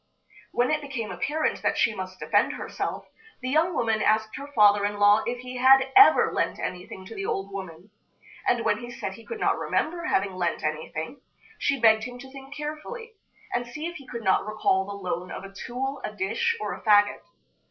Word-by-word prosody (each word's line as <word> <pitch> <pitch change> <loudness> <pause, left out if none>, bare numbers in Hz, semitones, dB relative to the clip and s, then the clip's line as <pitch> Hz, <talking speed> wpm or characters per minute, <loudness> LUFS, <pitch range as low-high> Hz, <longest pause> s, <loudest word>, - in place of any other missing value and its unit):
When 245 +3 +1
it 305 0 +1
became 255 -8 -5
apparent 295 - -1
that - - 0
she 225 - +3
must 185 -2 -7
defend - - +2
herself, - - -4 0.3
the 255 0 -3
young 325 +4 +2
woman 225 -4 +1
asked 220 0 +2
her 280 - -7
father 205 -4 +5
in 205 0 -1
law 205 +1 +5
if 245 +1 -2
he 250 0 -7
had 265 +1 +5
ever 405 +1 +7
lent - - 0
anything 185 +1 -6
to 225 - -9
the 195 -2 -4
old 195 +1 -3
woman; 190 0 -8 0.6
and 240 -1 +2
when 210 -1 +2
he 240 0 -8
said 235 -5 -5
he 230 - -13
could 460 - -6
not - - +1
remember 340 +2 -1
having 195 0 +1
lent 175 -2 -2
anything, 160 - -4 0.4
she 280 -1 +1
begged 220 -1 +5
him 245 0 -7
to 265 +1 -12
think 270 +1 -11
carefully, 310 +11 -6 0.4
and 245 0 -1
see 300 +6 -6
if 340 0 -5
he 275 - -14
could 235 -2 -6
not 190 -2 +3
recall 215 -3 +1
the 200 - -6 0.2
loan 180 +1 -3
of - - -7
a 195 0 -10
tool, 265 +6 -4
a - - -3
dish, 215 - -1
or - - -3
a - - -9
fagot. 205 -1 +4
225 Hz, 205 wpm, -26 LUFS, 195-270 Hz, 0.6 s, ever